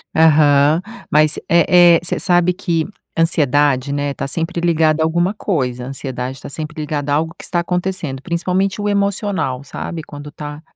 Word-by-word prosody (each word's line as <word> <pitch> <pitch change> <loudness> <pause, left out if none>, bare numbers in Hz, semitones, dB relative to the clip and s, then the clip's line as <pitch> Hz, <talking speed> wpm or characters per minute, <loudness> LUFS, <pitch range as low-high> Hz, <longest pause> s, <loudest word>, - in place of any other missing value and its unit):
Aham, 150 -1 +5 0.3
mas 155 0 +3
eh 170 +1 +6
eh, - - -4
você 175 - -2
sabe 175 -1 +3
que 170 -3 -1 0.3
ansiedade, 145 -4 +2
né, 145 0 -1
tá - - -4
sempre 165 +4 -3
ligada 160 -2 +2
a - - +3
alguma 175 +4 +1
coisa, 130 - -2
ansiedade 130 -1 -5
tá - - -8
sempre 155 +2 -6
ligada 145 -1 -3
a - - +4
algo 160 +2 -1
que - - -11
está 175 - -1
acontecendo, 175 -6 -3
principalmente 185 +4 -1
o 205 - -1
emocional, 200 - -1
sabe? 160 +3 -6
Quando 145 -1 -10
tá 150 0 -8
160 Hz, 165 wpm, -18 LUFS, 145-175 Hz, 0.3 s, eh